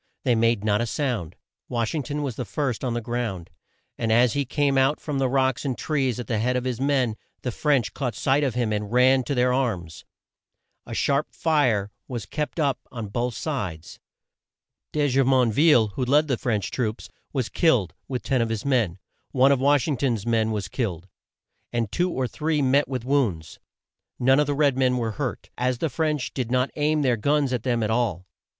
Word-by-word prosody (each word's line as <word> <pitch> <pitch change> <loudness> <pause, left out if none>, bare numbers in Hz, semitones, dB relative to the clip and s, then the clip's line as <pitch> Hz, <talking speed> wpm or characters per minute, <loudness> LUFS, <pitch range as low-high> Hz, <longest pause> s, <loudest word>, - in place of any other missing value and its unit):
They 125 - +3
made 115 -2 +2
not 105 0 +2
a 120 - -1
sound. 110 - -2 0.3
Wash 115 -2 -1
ing 155 - -1
ton 145 +2 -4
was 130 -5 -3
the 125 - -3
first 135 -1 -2
on 125 -2 -1
the 120 - -1
ground, 115 -7 -4 0.5
and 115 -1 0
as 120 0 +4
he 140 -1 0
came 140 +1 +1
out 135 +3 +3
from 145 -3 -3
the 130 -1 +1
rocks 130 -1 +1
and 135 -4 -2
trees 135 -6 -1
at 120 - -4
the 110 0 -1
head 125 +3 +1
of 125 - 0
his 130 -1 -3
men, 135 -5 +1 0.3
the 125 - -1
French 140 -2 +1
caught 125 -6 -3
sight 140 +5 +2
of 130 -5 -1
him 120 -3 0
and 105 0 -3
ran 130 +2 +4
to 140 - -2
their 125 0 +2
arms. 95 - -2 0.8
A - - -5
sharp 140 +1 +1
fire 125 -11 +1 0.2
was 120 -6 -5
kept 150 - -4
up 140 -5 +1
on 115 -4 -6
both 120 +2 -2
sides. 90 - -4 0.9
De 150 -1 +1
Ju 135 0 +3
mon 130 -3 +3
ville, 130 -4 +4
who 105 +6 -3
led 145 +5 +3
the 130 - +1
French 110 -5 -2
troops, 115 -3 -3 0.2
was 130 -5 -1
killed, 115 - +2
with 125 -2 -4
ten 130 -3 +1
of 115 - 0
his 115 +1 -3
men. 115 -10 +1 0.4
One 135 +1 +5
of 140 - +3
Wash 140 -1 +3
ing 145 -4 0
ton's 115 -6 -1
men 115 -2 +1
was 105 -3 -2
killed, 95 -7 -3 0.6
and 115 -4 -1
two 180 +1 +1
or 130 -6 -1
three 155 +3 -1
met 140 +2 +3
with 130 -3 -4
wounds. 115 - 0 0.6
None 135 +3 +4
of 150 - +2
the 145 - 0
red 140 -2 +3
men 125 -1 +3
were 115 -2 -1
hurt, 105 - -5
as 125 0 +1
the 160 - -1
French 150 -2 -1
did 125 -4 -3
not 125 +1 +1
aim 150 0 +1
their 125 -3 +2
guns 140 +2 +1
at 125 - -1
them 120 -2 0
at 110 - 0
all. 110 -7 0
125 Hz, 210 wpm, -24 LUFS, 115-140 Hz, 0.9 s, One